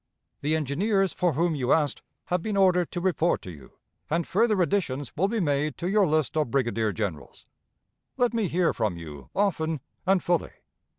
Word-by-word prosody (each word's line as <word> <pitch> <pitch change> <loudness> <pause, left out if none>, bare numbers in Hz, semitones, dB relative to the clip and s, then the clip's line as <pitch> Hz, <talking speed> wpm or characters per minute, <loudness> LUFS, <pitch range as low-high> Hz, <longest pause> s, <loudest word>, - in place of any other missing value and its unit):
"The 150 +2 +1
engineers 190 - +1
for 175 -3 +1
whom 165 +4 +1
you 130 -4 -1
asked 150 -4 +2 0.2
have 180 -1 0
been 210 +2 -2
ordered 180 -3 +3
to 175 - -3
report 175 -2 +1
to 90 - -7
you, 70 -5 -14 0.4
and 165 +2 0
further 215 0 +2
additions 150 -8 -2
will 190 +5 +2
be 225 +2 -1
made 150 -3 0
to 175 - -3
your 200 0 +3
list 155 -2 0
of 155 -5 +1
brigadier 115 -4 0
generals. 100 -7 -5 0.7
Let 245 -2 +2
me 225 -4 +1
hear 175 +1 +1
from 105 -7 -1
you 75 -4 -10
often 165 -6 0 0.3
and 190 -1 +3
fully. 175 -1 0
165 Hz, 180 wpm, -26 LUFS, 140-190 Hz, 0.7 s, ordered